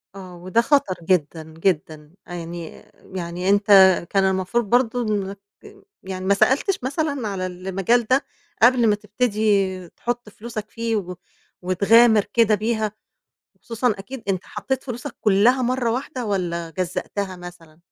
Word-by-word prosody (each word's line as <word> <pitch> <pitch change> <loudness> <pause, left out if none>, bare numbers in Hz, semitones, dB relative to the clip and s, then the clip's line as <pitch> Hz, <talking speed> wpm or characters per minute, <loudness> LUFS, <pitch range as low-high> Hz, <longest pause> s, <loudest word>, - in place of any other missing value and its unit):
آه، 185 -2 -10
وده 185 +6 0
خطر 270 -8 +2
جدًا، 165 -2 0
جدًا 155 -3 -2 0.2
يعني، 170 -1 -7 0.3
يعني 180 +1 -3
أنت 200 0 +2 0.4
كان 195 -1 +2
المفروض 190 +5 0
برضه 245 0 +2
إنك 200 -3 -2 0.6
يعني 185 0 -6
ما 200 - +4
سألتش 280 - +2
مثلًا 280 -2 -2
على 190 -2 -3
المجال 190 +6 0
ده، 260 +4 +2 0.4
قبل 240 -1 +5
ما 210 - +4
تبتدي 205 -4 0
تُحط 240 +2 -5
فلوسك 215 0 -7
فيه 230 -1 -2
و 180 -3 -3 0.5
وتغامر 210 +4 +5
كده 230 -4 +4
بيها، 220 0 -1 0.6
وخصوصًا 230 0 -1
أكيد 240 +5 -8
أنت 190 -2 -1
حطيت 265 -1 -4
فلوسك 245 -3 -6
كُلّها 225 +6 +3
مرّه 250 -1 0
واحدة 255 +1 -3
والَّا 170 -4 -2
جزَّأتها 185 +2 -4
مثلًا؟ 175 -3 -12
205 Hz, 135 wpm, -22 LUFS, 185-235 Hz, 0.6 s, قبل